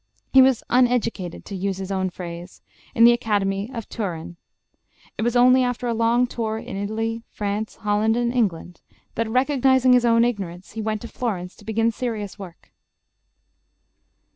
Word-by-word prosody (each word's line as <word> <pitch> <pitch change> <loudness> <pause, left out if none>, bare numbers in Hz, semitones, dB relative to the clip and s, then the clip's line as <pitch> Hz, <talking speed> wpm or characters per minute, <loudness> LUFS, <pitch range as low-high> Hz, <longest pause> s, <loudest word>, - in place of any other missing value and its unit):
He 265 - +9
was 260 -2 +3
"uneducated," 240 -7 0
to 200 - -7
use 190 0 -2
his 190 0 -5
own 190 -1 0
phrase, 175 0 -9 0.3
in 230 - +5
the 235 - +9
Academy 205 -3 0
of 230 -4 -6
Turin. 175 -5 -5 0.8
It - - -5
was 240 +2 0
only 255 +1 +6
after 245 0 -2
a 235 - 0
long 230 +2 +2
tour 225 -3 -3
in 220 - -7
Italy, 225 +3 -3
France, 210 +1 -3
Holland, 215 +2 +1
and 240 0 0
England, 180 -7 -1 0.3
that, 230 -1 -2
recognizing 260 0 +3
his 250 -1 +4
own 230 0 +4
ignorance, 190 -6 -4
he 225 - -5
went 215 -1 -2
to 235 - -7
Florence 190 -9 -4
to 205 - -17
begin 225 +1 +1
serious 220 -4 -5
work. 180 -4 -12
220 Hz, 165 wpm, -23 LUFS, 195-240 Hz, 0.8 s, He